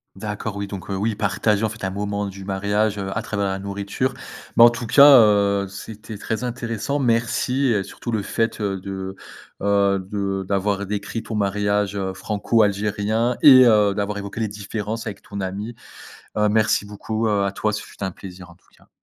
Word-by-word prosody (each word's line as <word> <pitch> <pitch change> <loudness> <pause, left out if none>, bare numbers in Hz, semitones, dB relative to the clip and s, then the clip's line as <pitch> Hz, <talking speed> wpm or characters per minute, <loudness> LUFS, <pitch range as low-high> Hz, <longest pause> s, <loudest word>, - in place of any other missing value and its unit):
D'accord, 105 -1 -5
oui, 100 - -3
donc, 100 -1 -8
heu, 95 - -2
oui, 110 +4 0
partager 105 +1 0
en 110 - +1
fait 110 -1 -10
un 95 - -2
moment 100 +1 -2
du 95 -1 -8
mariage, 100 +2 0
heu, 95 -1 -4
à - - -1
travers 100 -2 -2
la 95 0 -2
nourriture. 100 +6 -3 0.4
Mais 115 - +9
en 120 - +9
tout 120 -1 -5
cas, 140 +4 +7 0.2
heu, 100 -2 +3
c'était 105 +2 -9
très 115 +4 -3
intéressant, 120 +2 -3
merci 125 +2 +1
et 105 -5 +1
surtout 120 - -7
le 105 -3 -1
fait, 115 +1 -1
heu, 100 -2 -2
de, 95 0 -6 0.5
heu, 100 -1 +2
de 100 -1 -2
d'avoir 100 0 0
décrit 105 +2 -3
ton 110 - -6
mariage, 100 0 0
heu, 95 -1 -2
franco-algérien 105 +3 0
et 130 -3 +9
heu, 105 -3 +4
d'avoir 100 +1 -2
évoqué 100 +2 -6
les 110 - 0
différences 105 +2 -5
avec 100 -2 -6
ton 100 -1 -7
amie. 100 +5 -5 0.6
Heu, 105 0 +3
merci 105 -1 +2
beaucoup, 110 +2 -3
heu, 105 -2 +1
à 100 - 0
toi. 105 +2 -1
Ce - - -3
fut - - -15
un 95 - -2
plaisir, 90 -1 -11
en 85 - -17
tout - - -32
cas. - - -25
105 Hz, 195 wpm, -22 LUFS, 100-110 Hz, 0.6 s, Mais